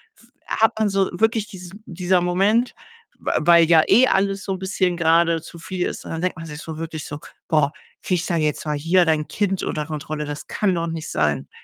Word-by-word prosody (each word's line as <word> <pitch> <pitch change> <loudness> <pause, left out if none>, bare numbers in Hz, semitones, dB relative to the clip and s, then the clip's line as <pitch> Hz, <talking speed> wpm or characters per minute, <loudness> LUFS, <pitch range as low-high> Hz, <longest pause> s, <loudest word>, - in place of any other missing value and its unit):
f 235 +1 -23 0.2
hat 225 0 +3
man 215 - +2
so 195 -1 +1
wirklich 220 +3 +1
diesen 190 0 -11
dieser 180 +1 0
Moment, 200 +7 +2 0.5
w - - -4
weil 170 +1 +6
ja 160 -1 +5
eh 240 +7 +6
alles 195 -1 0
so 195 - -1
'n 185 - -5
bisschen 190 -2 0
grade 165 -1 +3
zu 170 0 -12
viel 180 +1 -3
ist, - - -7
und - - -7
dann 165 - -4
denkt 185 0 -1
man 165 - -7
sich 150 -1 -8
so 160 -1 -7
wirklich 160 -2 -5
so: 145 - -7 0.3
„Boah, 150 -2 +2 0.3
krieg 180 -2 -1
da 170 - 0
jetzt 155 -1 -1
mal 150 -1 -1
hier 170 +5 +3
dein 155 -2 +1
Kind 195 -2 -1
unter 150 - -2
Kontrolle.“ 155 0 -4
Das 145 +1 -7
kann 200 -3 0
doch 170 -1 -1
nicht 165 -1 -5
sein, 75 -3 0
170 Hz, 220 wpm, -22 LUFS, 155-190 Hz, 0.5 s, weil